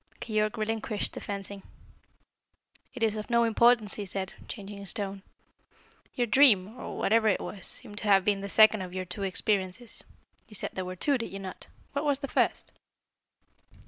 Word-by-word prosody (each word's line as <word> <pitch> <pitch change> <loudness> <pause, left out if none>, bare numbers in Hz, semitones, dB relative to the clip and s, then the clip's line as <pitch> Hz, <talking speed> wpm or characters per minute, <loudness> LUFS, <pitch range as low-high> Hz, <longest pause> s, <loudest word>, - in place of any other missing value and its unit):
Keyork 215 0 0
relinquished 220 -1 -1
the - - -7
fencing. 200 0 -5 1.3
"It 245 - -3
is 220 -1 +2
of 215 - -6
no 235 -1 +4
importance," 230 -1 +4
he 205 - -3
said, 190 0 -4
changing 200 -2 -7
his 200 +1 -4
tone. 200 -2 -3 0.9
"Your 245 - +2
dream 220 -4 +5
or - - -6
whatever 220 +1 +3
it 200 - +3
was 195 -3 -6
seems 205 - -8
to 215 - -4
have 195 -2 +5
been 200 -1 +2
the 200 - -5
second 215 0 +6
of 180 0 -7
your 185 0 -2
two 180 +3 -6
experiences. 195 +3 -1 0.4
You 215 - -6
said - - 0
there 185 - -3
were 185 0 -5
two, 275 +8 +1
did 230 - -5
you 195 - -5
not? 190 -1 -8 0.3
What 280 +1 -1
was 285 -2 +3
the 275 0 -5
first?" - - 0
210 Hz, 180 wpm, -29 LUFS, 195-230 Hz, 1.3 s, second